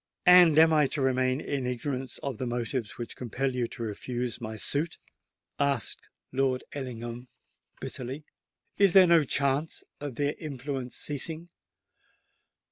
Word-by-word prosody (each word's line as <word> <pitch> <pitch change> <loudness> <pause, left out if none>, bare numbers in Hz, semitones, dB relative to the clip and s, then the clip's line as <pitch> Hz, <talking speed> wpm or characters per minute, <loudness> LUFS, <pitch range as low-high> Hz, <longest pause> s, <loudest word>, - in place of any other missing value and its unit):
"And 180 -4 +8
am 160 0 +7
I 150 -2 +4
to 145 - -2
remain 130 0 +2
in 140 -4 -2
ignorance 130 +1 -3
of 135 -5 -4
the 130 - -2
motives 120 -1 -3
which 120 - -6
compel 130 +2 -2
you 125 -2 -1
to 115 - -7
refuse 120 +2 -3
my 110 -1 -5
suit?" 145 +9 -1 0.6
asked 140 -4 -1 0.2
Lord 130 -1 +1
Ellingham 120 -2 -6 0.5
bitterly. 130 +4 -6 0.5
"Is 200 -3 +5
there 190 -1 +9
no 170 -2 +5
chance 140 +2 0 0.2
of 145 -4 -5
their 145 +3 0
influence 135 -4 -5
ceasing? 160 +4 -3
135 Hz, 135 wpm, -28 LUFS, 125-145 Hz, 0.6 s, there